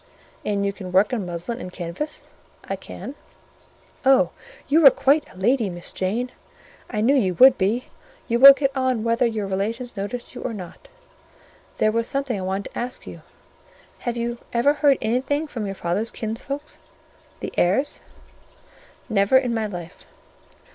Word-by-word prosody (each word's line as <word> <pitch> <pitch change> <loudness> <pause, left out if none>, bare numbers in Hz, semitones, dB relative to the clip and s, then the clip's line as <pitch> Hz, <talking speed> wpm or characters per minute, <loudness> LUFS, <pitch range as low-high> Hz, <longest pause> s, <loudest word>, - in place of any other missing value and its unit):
"And 200 -1 -1
you 200 - -1
can 190 -3 -8
work 195 +6 +3
on 210 -7 -2
muslin 175 +8 -4
and 180 - -7
canvas?" 180 - -5 0.4
"I - - -4
can." 270 - -9 0.9
"Oh, 270 0 +4 0.4
you 315 +3 +4
are - - +13
quite 285 +3 +2
a - - -17
lady, 225 +2 +2
Miss 175 -1 -6
Jane! 230 +7 -2 0.6
I 210 -3 -2
knew 245 +6 +4
you 195 -10 +2
would 260 +6 +8
be: 215 +5 0 0.4
you 235 -1 +1
will 275 +2 +12
get 275 0 -1
on 260 -4 0
whether 230 +1 +2
your 220 -3 -2
relations 220 +6 -3
notice 205 +5 -5
you - - -8
or 225 - -4
not. 185 - -10 0.9
There 215 - +3
was 230 +1 -1
something 275 -6 -2
I - - -5
wanted 190 +2 -3
to - - -6
ask 245 +1 -5
you. - - -10 0.8
Have 240 -1 -3
you 235 0 -3
ever 245 +5 +3
heard 290 -2 +3
anything 260 +7 0
from 230 -8 -5
your 195 - -4
father's 190 +6 -1
kinsfolk, 240 +6 -4 0.8
the - - -6
Eyres?" 200 +12 +1 1.1
"Never 200 +4 +4
in 250 -3 +1
my 220 -2 -1
life." 175 -3 -9
230 Hz, 165 wpm, -23 LUFS, 195-260 Hz, 1.1 s, are